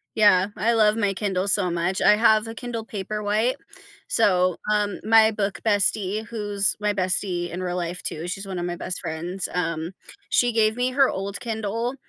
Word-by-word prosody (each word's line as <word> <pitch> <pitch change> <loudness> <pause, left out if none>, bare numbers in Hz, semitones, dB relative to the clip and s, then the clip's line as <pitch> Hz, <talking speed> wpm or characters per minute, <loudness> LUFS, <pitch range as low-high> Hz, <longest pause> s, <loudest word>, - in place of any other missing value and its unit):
yeah, 205 -3 +5
I 230 - +1
love 215 -2 +3
my 205 -3 0
Kindle 190 -1 -2
so 200 -2 +2
much. 175 +2 -1
I - - +6
have 220 0 +3
a 225 - -7
Kindle 230 -2 -5
Paperwhite, 210 +3 -1 0.5
so, 185 - +2 0.2
um, 210 -1 0
my 220 0 +5
book 205 -2 -3
bestie, 205 0 +1
who's 205 -3 +1
my 210 0 0
bestie 185 -2 0
in 175 +2 -6
real 180 -1 -3
life, 175 0 -3
too, 160 +3 -4
she's 195 +2 -5
1 185 -2 -4
of 175 - -3
my 175 0 -3
best 185 - -4
friends, 170 +3 -4
um, 165 -2 -2 0.4
she 245 -1 +2
gave 220 0 +2
me 250 +1 0
her 270 +1 +3
old 195 +1 -4
Kindle, 230 +2 -3
205 Hz, 185 wpm, -23 LUFS, 185-220 Hz, 0.5 s, I